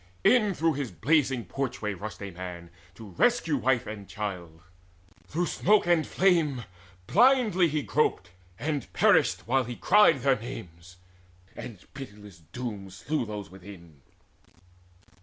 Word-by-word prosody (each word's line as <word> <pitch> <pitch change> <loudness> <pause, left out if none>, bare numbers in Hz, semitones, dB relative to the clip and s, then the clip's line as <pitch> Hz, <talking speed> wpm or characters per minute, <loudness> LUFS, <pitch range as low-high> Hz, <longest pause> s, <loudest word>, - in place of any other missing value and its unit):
In 215 -6 +4
through 165 0 +1
his 140 -3 -3
blazing 130 - +1
porchway 120 -6 -3
rushed 100 0 -7
a 100 - -6
man 85 -1 -8 0.2
To 110 -3 -11
rescue 165 - +2
wife 125 -1 +1
and 105 -2 -8
child. 90 -6 -6 0.7
Through 175 +4 -1
smoke 210 +4 +2
and 175 -3 +2
flame 165 -9 +2 0.4
Blindly 235 - +4
he 150 -2 -2
groped, 145 - 0 0.3
and 145 -1 -3
perished - - +3
while 130 +2 +2
he 120 +1 -6
cried 170 - +4
Their 135 -1 +2
names, 90 -6 -10 0.6
and 115 -5 -8 0.2
pitiless 105 - -11
doom 105 -6 -6
slew 120 +7 -3
those 105 -2 -7
within. 90 -6 -13
120 Hz, 130 wpm, -27 LUFS, 100-155 Hz, 0.7 s, In